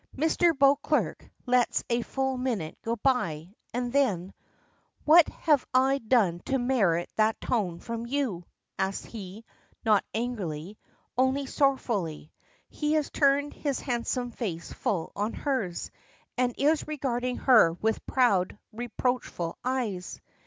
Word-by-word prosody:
Mr. 320 +2 +2
Beauclerk 280 +1 +2 0.2
lets 250 -1 +2
a 235 0 +1
full 265 +2 -2
minute 240 -11 -2
go 230 +1 -1
by, 195 - 0 0.2
and 245 +1 -3
then 200 -10 +1 0.7
"What 320 +2 +7
have 300 -5 +2
I 265 +2 +4
done 215 -8 +2
to 270 - +1
merit 210 -10 +1
that 220 0 +2
tone 190 -8 -1
from 230 0 -5
you?" 245 -10 -1 0.4
asks 190 0 -1
he, 210 0 -9 0.4
not 215 -3 +4
angrily; 205 -6 -4 0.4
only 260 +2 +2
sorrowfully. 230 - 0 0.4
He 300 0 -1
has 305 -2 0
turned 285 0 +2
his 280 -4 -2
handsome 245 -1 -2
face 175 -9 -5
full 175 -6 -2
on 210 +3 -1
hers, 255 - -2 0.4
and 245 -1 0
is 300 +2 +2
regarding 250 -4 -2
her 220 -11 +5
with 220 +6 -1
proud, 205 -8 +2 0.2
reproachful 240 -6 -2
eyes. 235 -8 -2
240 Hz, 125 wpm, -28 LUFS, 195-270 Hz, 0.7 s, What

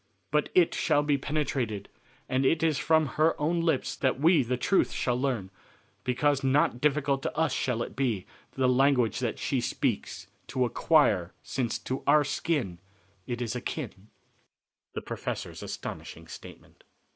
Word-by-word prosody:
But 150 0 +1
it 175 -2 +5
shall 145 - +2
be 145 -1 +1
penetrated, 130 -8 -2 0.4
and 130 +1 +1
it 155 +4 +2
is 155 -4 +2
from 160 -1 +3
her 155 +3 +1
own 165 +3 +1
lips 160 -5 0
that 130 -1 0
we 160 +1 +5
the 125 0 -1
truth 195 +9 +2
shall 125 - 0
learn, 125 -7 -1 0.5
because 135 +2 +1
not 135 -2 +2
difficult 140 -2 +2
to - - -4
us 160 -4 +2
shall 120 -3 0
it - - -8
be 120 -8 -1 0.3
the 130 -1 +1
language 125 -3 +3
that - - -2
she - - -1
speaks - - -2 0.2
to 130 -1 0
acquire 115 - +3
since 125 -4 -2
to 130 - -4
our 150 -1 +5 0.2
own 115 - 0 0.5
it 120 0 -2
is 115 0 -3
akin." 120 -5 -5 0.9
The - - -3
Professor's - - -5
Astonishing - - -7
Statement. - - -13
135 Hz, 155 wpm, -28 LUFS, 125-150 Hz, 0.9 s, it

